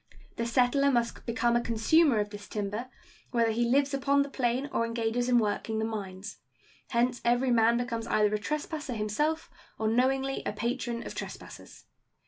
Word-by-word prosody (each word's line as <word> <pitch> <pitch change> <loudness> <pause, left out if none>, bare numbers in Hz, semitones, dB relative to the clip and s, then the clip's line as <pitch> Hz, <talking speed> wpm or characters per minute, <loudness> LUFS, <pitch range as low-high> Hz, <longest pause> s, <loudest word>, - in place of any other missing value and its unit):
The 230 - -1
settler 255 +3 +3
must 235 -1 -1
become 235 0 +1
a 240 - +3
consumer 235 +4 +3
of 205 0 -2
this 205 -1 -9
timber, 210 +4 -4 0.4
whether 230 -2 +2
he 235 +1 0
lives 275 +2 +2
upon 280 +1 +2
the 280 - -9
plain 255 +1 0
or - - +1
engages 230 +1 -1
in 245 - +5
working 220 0 0
the 220 - 0
mines. 200 -3 -6 0.5
Hence 245 0 +1
every 245 +2 +2
man 230 0 +4
becomes 235 -2 -3
either 210 -1 +2
a 210 - +1
trespasser 300 +2 -3
himself 265 +10 -1 0.3
or 220 - -1
knowingly 265 +4 +1
a - - -3
patron 235 +1 -3
of - - -6
trespassers. - - -9
235 Hz, 170 wpm, -29 LUFS, 220-260 Hz, 0.5 s, in